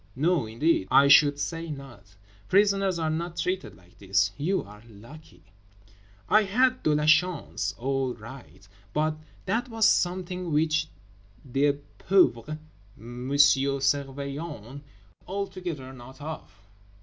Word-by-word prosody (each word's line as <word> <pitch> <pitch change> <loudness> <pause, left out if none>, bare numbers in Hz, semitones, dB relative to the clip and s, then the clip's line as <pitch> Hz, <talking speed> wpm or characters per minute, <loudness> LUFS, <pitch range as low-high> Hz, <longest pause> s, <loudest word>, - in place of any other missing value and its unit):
No 160 -2 +1
indeed, 115 - +1
I 140 -2 +6
should 145 0 +6
say 165 +2 -4
not. 130 -9 -10 0.3
Prisoners 195 -2 +3
are 160 -1 -1
not 170 +2 -4
treated 185 +1 -2
like 90 +1 -23
this. 100 0 +1
You 185 +7 -1
are 105 +1 -14
lucky." 115 - -15 0.8
I 215 - +5
had 250 +6 +1
de 150 - +2
la 150 0 0
chance 160 +1 +1
all 135 0 -1
right, 115 -3 -13 0.3
but 155 +1 0 0.3
that 240 +2 -1
was 225 -2 +3
something 180 -1 0
which 155 +1 +1 0.6
the 140 +3 +2 0.3
pauvre 155 -6 +2 0.4
M. 120 +3 -8
Surveillant 140 0 +1
wot 130 +6 -10 0.5
altogether 180 -8 -5
not 130 +2 -13
of. 155 -5 -7
150 Hz, 125 wpm, -26 LUFS, 130-175 Hz, 0.8 s, I